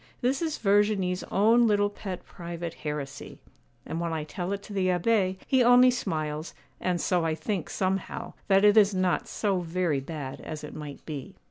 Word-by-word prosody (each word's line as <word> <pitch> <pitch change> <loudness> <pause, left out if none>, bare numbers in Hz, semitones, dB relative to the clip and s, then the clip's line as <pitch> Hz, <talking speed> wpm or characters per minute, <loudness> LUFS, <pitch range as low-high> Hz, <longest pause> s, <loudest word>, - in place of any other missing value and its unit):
This 260 +4 +1
is 320 -2 -1
Verginie's 200 -3 +2
own 230 +4 +4
little 205 -1 +2
pet 190 -3 -7
private 170 -1 -6
heresy, 150 -3 -6 0.5
and 165 - -4
when 170 -1 -2
I 160 -1 -2
tell 175 +4 -4
it 200 0 -3
to 210 - -9
the 190 -2 +1
Abbé, 185 +1 +2
he 260 -2 +3
only 245 +1 +7
smiles; 155 -8 -3 0.2
and 180 -1 0
so 175 -1 +1
I 160 -1 0
think, 180 +2 -3
somehow, 190 0 -2
that 195 +1 +5
it 210 +1 +6
is 205 -2 +6
not 185 -1 +1
so 200 -3 0
very 170 -3 0
bad 140 -1 -6
as 155 -1 -7
it 150 - -7
might 150 -2 -8
be. 145 -4 -7
185 Hz, 185 wpm, -27 LUFS, 160-205 Hz, 0.5 s, only